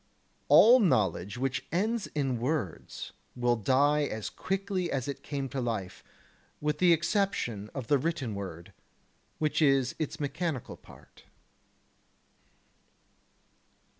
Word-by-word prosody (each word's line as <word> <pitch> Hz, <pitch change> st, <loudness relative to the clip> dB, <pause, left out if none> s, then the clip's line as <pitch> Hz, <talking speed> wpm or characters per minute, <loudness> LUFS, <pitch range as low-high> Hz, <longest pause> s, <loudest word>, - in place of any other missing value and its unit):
All 245 Hz, +4 st, +8 dB
knowledge 100 Hz, -, +1 dB
which 135 Hz, +2 st, -2 dB
ends 215 Hz, +5 st, 0 dB
in 135 Hz, -5 st, 0 dB
words 125 Hz, -, -3 dB, 0.2 s
will 120 Hz, -1 st, +2 dB
die 140 Hz, +6 st, +3 dB
as 110 Hz, -5 st, -4 dB
quickly 190 Hz, -2 st, -2 dB
as 135 Hz, -2 st, -2 dB
it 140 Hz, -, -5 dB
came 140 Hz, -2 st, -4 dB
to 130 Hz, +2 st, -3 dB
life, 110 Hz, -6 st, -4 dB, 0.6 s
with 150 Hz, 0 st, -1 dB
the 180 Hz, -1 st, +5 dB
exception 165 Hz, -, 0 dB
of 135 Hz, -4 st, -4 dB
the 145 Hz, +3 st, +3 dB
written 150 Hz, -6 st, -2 dB
word: 95 Hz, -4 st, -7 dB, 0.6 s
which 155 Hz, +1 st, 0 dB
is 135 Hz, -4 st, +3 dB
its 160 Hz, +1 st, -3 dB
mechanical 145 Hz, -1 st, -3 dB
part. -, -, -18 dB
140 Hz, 115 wpm, -29 LUFS, 120-165 Hz, 0.6 s, All